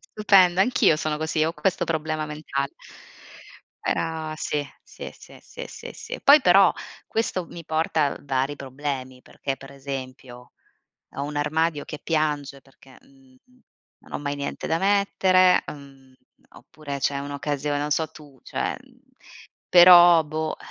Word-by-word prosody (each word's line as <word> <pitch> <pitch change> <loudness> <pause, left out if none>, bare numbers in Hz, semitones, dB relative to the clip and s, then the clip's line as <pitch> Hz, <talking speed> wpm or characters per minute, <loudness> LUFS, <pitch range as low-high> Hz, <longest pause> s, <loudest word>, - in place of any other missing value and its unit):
stupendo. 190 -4 +3
Anch'io 195 -7 +3
sono 155 -1 -2
così, 155 0 0
ho 160 - -1
questo 190 +1 -1
problema 155 -1 -2
mentale. 150 -2 -4 1.1
Era 160 -1 -2
sì, 150 -1 -2 0.2
sì, - - -10
sì, - - -15
sì, - - -10
sì, - - -10
sì, - - -8
poi 290 +2 +7
però, 190 -4 +5 0.3
questo 190 -5 -2
mi 170 0 -10
porta, 155 -2 0
uhm, - - -20
vari 135 +1 -1
problemi, 130 -2 -6
perché 135 -1 -5
per 135 0 -13
esempio 130 -2 -8 0.7
ho 140 - -3
un 145 +1 -6
armadio 150 +1 0
che 150 - -8
piange 150 -4 -1
perché, 135 0 -20
mhmm, 270 -1 -24 0.6
non - - -17
ho - - -3
mai 145 0 -3
niente 140 0 -5
da 165 - 0
mettere, 190 -2 +3
mhmm, 135 -2 -15 0.4
oppure 145 -2 -8
c'è 140 +1 0
un'occasione, 145 0 -3
non 145 +1 -3
so 160 +2 +1
tu, 145 -4 -16
cioè, - - -3
mhmm, - - -23 0.7
però 175 -2 +8
boh, 155 +1 -4
150 Hz, 145 wpm, -24 LUFS, 140-170 Hz, 1.1 s, però